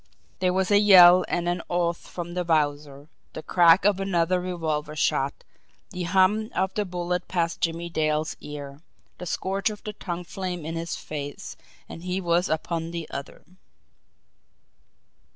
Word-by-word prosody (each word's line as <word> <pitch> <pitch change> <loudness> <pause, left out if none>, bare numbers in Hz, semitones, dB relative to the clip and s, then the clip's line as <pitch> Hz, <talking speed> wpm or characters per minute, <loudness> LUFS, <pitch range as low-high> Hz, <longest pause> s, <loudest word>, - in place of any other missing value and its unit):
There 185 -1 +2
was 190 +1 0
a 205 - +6
yell 185 -3 +8
and 175 0 -1
an 175 0 -1
oath 170 -1 -1
from 175 -1 -6
the 180 0 -1
Wowzer 145 -3 -1 0.3
the 155 - -7
crack 175 +1 +5
of 205 -2 +3
another 180 -2 +1
revolver 160 -4 -3
shot, 140 -2 0 0.5
the 180 -1 -4
hum 200 +4 +3
of 190 0 0
the 210 - -1
bullet 180 -1 -3
past 170 -2 -1
Jimmie 170 +1 -1
Dale's 155 -1 -1
ear, 145 -1 -8 0.4
the 180 - -6
scorch 195 +4 -1
of 210 -1 -9
the 210 - -5
tongue 180 -3 -5
flame 180 -2 -5
in 165 - -4
his 165 0 -3
face, 145 -2 -7 0.3
and 165 - -9
he 180 +1 -2
was 175 0 +1
upon 165 +1 -2
the 170 -2 -5
other. 140 +1 -7
175 Hz, 155 wpm, -25 LUFS, 160-185 Hz, 0.5 s, yell